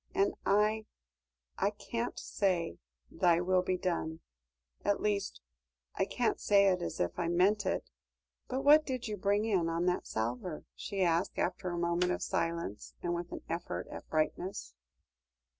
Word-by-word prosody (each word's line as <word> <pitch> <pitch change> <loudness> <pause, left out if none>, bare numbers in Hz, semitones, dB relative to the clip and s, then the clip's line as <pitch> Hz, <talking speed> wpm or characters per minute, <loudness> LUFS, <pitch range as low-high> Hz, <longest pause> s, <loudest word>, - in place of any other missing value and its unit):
And 200 - +3
I 215 +2 +3 0.7
I 200 - +3
can't 230 +3 -4
say, 175 - 0 0.3
'Thy 175 -1 +3
will 185 +1 +3
be 185 0 0
done'; 165 -3 -2 0.6
at 205 - +2
least, 205 -1 -1 0.5
I 190 - +1
can't 240 +3 0
say 200 -1 +5
it 180 -1 +1
as - - -4
if 85 - -1
I 170 - 0
meant 190 +4 +3
it. - - -2 0.6
But 260 +1 -2
what 300 +2 +8
did 255 -4 -3
you 210 - -2
bring 205 +2 +1
in 185 -7 +2
on 165 +1 0
that 180 0 0
salver?" 125 +9 -3
she 195 -2 -2
asked, 170 +1 +1
after 185 -2 -1
a 175 - -3
moment 170 +1 +1
of - - -1
silence, 165 -11 -2
and 175 - 0
with 175 0 -4
an - - -5
effort 170 +1 -3
at - - -9
brightness. 155 - -1
185 Hz, 160 wpm, -32 LUFS, 170-205 Hz, 0.7 s, what